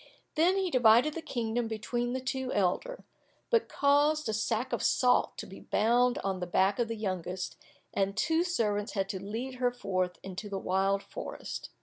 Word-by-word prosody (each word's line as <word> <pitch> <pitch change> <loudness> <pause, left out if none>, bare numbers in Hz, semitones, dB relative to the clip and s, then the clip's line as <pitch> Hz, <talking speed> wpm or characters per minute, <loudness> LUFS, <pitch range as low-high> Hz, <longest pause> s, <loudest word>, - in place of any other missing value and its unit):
Then 350 +5 +3
he 380 -2 0
divided 245 +3 +5
the 330 - -5
kingdom 235 -4 -2
between 240 +2 -2
the 260 - -1
two 260 0 -3
elder, 205 - 0 0.5
but 465 -1 +3
caused 290 +1 +3
a 220 - -1
sack 225 +3 -1
of - - 0
salt 250 -1 +3
to - - -5
be - - -11
bound 245 +3 +2
on 195 -1 -1
the 180 - -3
back 190 +4 +2
of 240 - +2
the 230 - -3
youngest, 185 -3 -3 0.4
and 195 +1 0
two 320 +7 +2
servants 210 - -1
had 195 -2 0
to 190 - -4
lead 240 +6 -5
her 245 -1 +2
forth 185 -7 -2
into 195 +2 -6
the 195 - -3
wild 195 +1 +1
forest. - - -7
230 Hz, 185 wpm, -30 LUFS, 195-260 Hz, 0.5 s, divided